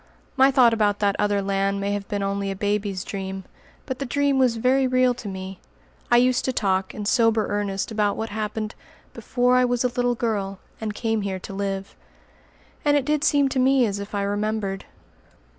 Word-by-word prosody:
My 270 Hz, 0 st, +6 dB
thought 255 Hz, -3 st, +5 dB
about 210 Hz, -2 st, +2 dB
that 200 Hz, -1 st, +1 dB
other 205 Hz, -1 st, +1 dB
land 195 Hz, 0 st, 0 dB
may 200 Hz, 0 st, -1 dB
have 205 Hz, -1 st, -3 dB
been 200 Hz, -1 st, -2 dB
only 200 Hz, 0 st, -2 dB
a 195 Hz, -, -3 dB
baby's 205 Hz, -1 st, -1 dB
dream; 190 Hz, -1 st, -5 dB, 0.4 s
but 260 Hz, -2 st, -5 dB
the 275 Hz, -, -2 dB
dream 280 Hz, +1 st, +1 dB
was 250 Hz, -3 st, +3 dB
very 260 Hz, +3 st, +3 dB
real 255 Hz, 0 st, +3 dB
to 245 Hz, -3 st, -9 dB
me. 190 Hz, -1 st, -6 dB, 0.5 s
I 240 Hz, -, +5 dB
used 250 Hz, +1 st, +3 dB
to 260 Hz, -, +1 dB
talk, 190 Hz, -5 st, -1 dB
in 210 Hz, -, -5 dB
sober 225 Hz, -1 st, +3 dB
earnest, 205 Hz, 0 st, -2 dB
about 210 Hz, -2 st, 0 dB
what 225 Hz, 0 st, -3 dB
happened 215 Hz, +1 st, -3 dB, 0.4 s
"before 250 Hz, 0 st, +1 dB
I 255 Hz, -, +4 dB
was 245 Hz, 0 st, +1 dB
a 250 Hz, -, +2 dB
little 245 Hz, 0 st, 0 dB
girl, 205 Hz, -4 st, -2 dB, 0.2 s
and 215 Hz, -1 st, -3 dB
came 225 Hz, -1 st, -1 dB
here 195 Hz, -1 st, -3 dB
to 195 Hz, -, -8 dB
live"; 195 Hz, 0 st, -4 dB, 0.9 s
and 290 Hz, 0 st, +4 dB
it 275 Hz, -, -1 dB
did 300 Hz, 0 st, 0 dB
seem 285 Hz, -2 st, +3 dB
to 265 Hz, -, -1 dB
me 260 Hz, 0 st, +4 dB
as 200 Hz, -2 st, -2 dB
if 200 Hz, +1 st, -6 dB
I 200 Hz, -, 0 dB
remembered. 205 Hz, -1 st, -2 dB
215 Hz, 200 wpm, -24 LUFS, 200-250 Hz, 0.9 s, My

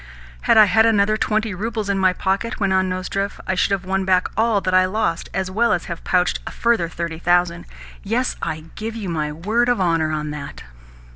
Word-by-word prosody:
"Had -, -, +6 dB
I 215 Hz, -, +9 dB
had 220 Hz, +3 st, +4 dB
another 215 Hz, -1 st, +3 dB
twenty 215 Hz, -1 st, 0 dB
roubles 215 Hz, +2 st, -3 dB
in 200 Hz, -1 st, 0 dB
my 185 Hz, -1 st, +4 dB
pocket," 195 Hz, +5 st, -2 dB
went 195 Hz, -2 st, +1 dB
on 190 Hz, 0 st, +2 dB
Nozdrev, 195 Hz, +2 st, -3 dB
"I 190 Hz, -, -1 dB
should 185 Hz, -, +1 dB
have 195 Hz, -2 st, -1 dB
won 190 Hz, +1 st, 0 dB
back 185 Hz, -1 st, +2 dB
all 220 Hz, 0 st, +2 dB
that 185 Hz, -1 st, -2 dB
I 185 Hz, -, +6 dB
have 185 Hz, -, 0 dB
lost, 190 Hz, -5 st, -1 dB
as 190 Hz, 0 st, -3 dB
well 235 Hz, +4 st, +2 dB
as 175 Hz, -, -2 dB
have 170 Hz, -1 st, -7 dB
pouched 180 Hz, -1 st, +1 dB
a -, -, -2 dB
further 230 Hz, -8 st, 0 dB
thirty 170 Hz, -1 st, -5 dB
thousand. 175 Hz, 0 st, +1 dB, 0.3 s
Yes, 235 Hz, +5 st, -1 dB
I 155 Hz, 0 st, -3 dB
give 220 Hz, +1 st, -5 dB
you 210 Hz, -5 st, -5 dB
my 155 Hz, -3 st, -2 dB
word 215 Hz, +10 st, 0 dB
of 245 Hz, -, +1 dB
honour 165 Hz, -3 st, +1 dB
on 150 Hz, -1 st, -3 dB
that." 150 Hz, -1 st, -8 dB
190 Hz, 220 wpm, -21 LUFS, 175-215 Hz, 0.3 s, I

